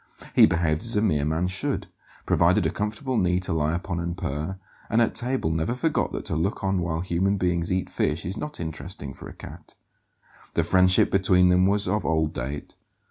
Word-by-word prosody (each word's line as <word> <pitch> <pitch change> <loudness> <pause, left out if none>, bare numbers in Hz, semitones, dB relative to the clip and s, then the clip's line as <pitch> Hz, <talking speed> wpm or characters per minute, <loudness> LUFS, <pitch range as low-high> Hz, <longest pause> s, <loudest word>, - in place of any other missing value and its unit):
He - - +7
behaved 80 -2 0
as 115 -1 -4
a 105 - +3
mere 75 -9 +1
man 80 +3 0
should: 95 +1 -2 0.4
provided - - +3
a - - +1
comfortable 115 +5 -2
knee 90 0 +2
to 90 - -1
lie 80 0 +1
upon 90 0 -3
and 85 0 -3
purr, 75 +5 -3 0.3
and 115 - +2
at 115 - +2
table 125 -9 -1
never 80 +9 -1
forgot 150 +4 0
that - - -4
to - - -2
look 95 +7 -1
on 95 -1 +1
while 85 -1 -2
human 95 +3 0
beings 90 -2 0
eat 95 0 0
fish 75 +2 -1
is 90 +3 -3
not 150 +5 -6
interesting 80 -3 -6
for - - -10
a - - -11
cat. - - -11 0.8
The 85 - +3
friendship 90 +2 +4
between 90 -2 +4
them 90 +1 +4
was 100 0 +1
of 105 +3 0
old 80 -1 +1
date. 70 +4 -5
90 Hz, 200 wpm, -25 LUFS, 80-100 Hz, 0.8 s, He